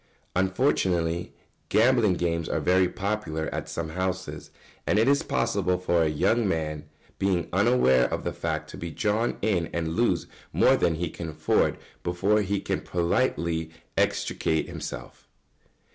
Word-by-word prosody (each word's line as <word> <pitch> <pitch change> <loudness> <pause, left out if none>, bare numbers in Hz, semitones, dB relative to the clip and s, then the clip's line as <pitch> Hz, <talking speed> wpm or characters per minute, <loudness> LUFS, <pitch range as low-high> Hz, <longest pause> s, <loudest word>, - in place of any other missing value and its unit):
] - - -38
Unfortunately, 90 -4 +1 0.4
gambling 115 -4 +4
games 85 -1 -1
are - - 0
very 90 0 +3
popular 100 -6 -2
at - - -4
some 85 -1 -4
houses, 95 +2 -3 0.4
and - - +3
it 110 +3 +4
is 140 +1 +4
possible 90 0 0
for 85 -2 +1
a 80 - +3
young 110 +9 +2
man, 75 -4 -2 0.3
being 95 -4 +1
unaware 95 - +4
of - - -2
the - - -2
fact, 80 -2 -3
to - - -9
be 85 - -5
drawn 105 +9 0
in 90 -7 +1
and 85 -1 -1
lose 95 -3 +1 0.3
more - - +4
than 85 -2 +1
he 85 0 -3
can 85 -2 -6
afford 75 - +1 0.2
before 100 +5 +1
he 100 0 -1
can - - -2
politely 85 -3 0 0.3
extricate 80 -1 0
himself. - - -8
90 Hz, 150 wpm, -26 LUFS, 80-100 Hz, 0.4 s, gambling